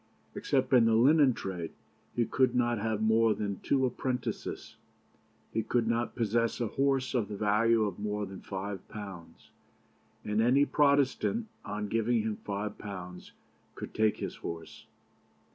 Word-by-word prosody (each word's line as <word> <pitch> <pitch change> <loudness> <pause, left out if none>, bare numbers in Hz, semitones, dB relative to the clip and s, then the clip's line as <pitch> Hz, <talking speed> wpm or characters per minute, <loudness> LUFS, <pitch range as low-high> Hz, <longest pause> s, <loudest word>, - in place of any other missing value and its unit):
Except - - 0
in 120 -3 +7
the 115 -1 +4
linen 135 +3 +5
trade, 90 -4 -5 0.4
he 120 - +2
could 130 +2 +2
not 120 -2 +2
have 110 0 -1
more 110 0 +4
than 100 -1 -3
two 135 -2 +1
apprentices. 125 0 -3 0.8
He 115 - +1
could 115 +1 0
not 115 +1 0
possess 115 0 0
a 120 -3 -1
horse 135 +1 +1
of 120 -5 +1
the 105 - -6
value 110 +2 +3
of 100 -3 -3
more 105 0 -2
than 95 -1 -9
five 95 -1 -5
pounds, 95 -6 -10 0.7
and 105 +1 +1
any 130 +5 +4
Protestant, 145 - +2
on 105 +1 -4
giving 115 +1 +1
him 110 -1 -2
five 105 +1 -4
pounds, 90 -3 -8 0.4
could - - -7
take 110 -1 +2
his - - -5
horse. 80 -1 -8
110 Hz, 150 wpm, -30 LUFS, 105-120 Hz, 0.8 s, in